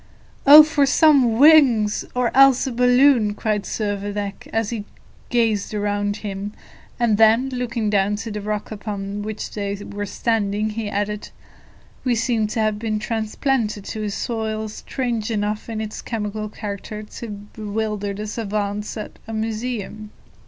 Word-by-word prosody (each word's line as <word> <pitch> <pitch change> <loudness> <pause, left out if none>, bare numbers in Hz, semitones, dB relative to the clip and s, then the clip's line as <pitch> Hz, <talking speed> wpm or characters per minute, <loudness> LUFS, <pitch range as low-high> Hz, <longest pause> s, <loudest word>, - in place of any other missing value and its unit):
"Oh 300 +2 +12
for 295 -2 +2
some 270 -6 +4
wings, 260 -8 +5
or 250 -1 0
else 270 -1 +6
a 265 - -2
balloon!" 245 -2 +4
cried 210 -2 -1
Servadac, 205 -1 -3
as 225 0 -1
he 215 -3 -4 0.4
gazed 225 -4 +1
around 205 0 -1
him; 200 +1 -4 0.5
and 225 -3 +2
then, 225 +4 +5
looking 235 -4 -2
down 200 0 +2
to 225 +2 -5
the 210 0 -4
rock 210 +1 -3
upon 205 -1 -5
which 215 0 -5
they 200 -1 -3
were 205 0 -6
standing, 215 -1 0
he 215 -1 -4
added, 205 +1 -3 0.7
"We 250 -2 +1
seem 230 -1 +1
to 215 - -3
have 215 -1 0
been 220 -1 -1
transplanted 220 0 -1
to 220 - -5
a - - -2
soil 220 0 -3
strange 235 0 -3
enough 210 0 -2
in 220 -1 -3
its 215 -1 -5
chemical 215 -1 -4
character 210 0 -6
to 230 +2 -9
bewilder 205 0 -4
the 210 +1 -5
savants 210 -1 -3
at 215 - -8
a 225 - -6
museum." 220 -1 -4
215 Hz, 150 wpm, -22 LUFS, 205-230 Hz, 0.7 s, Oh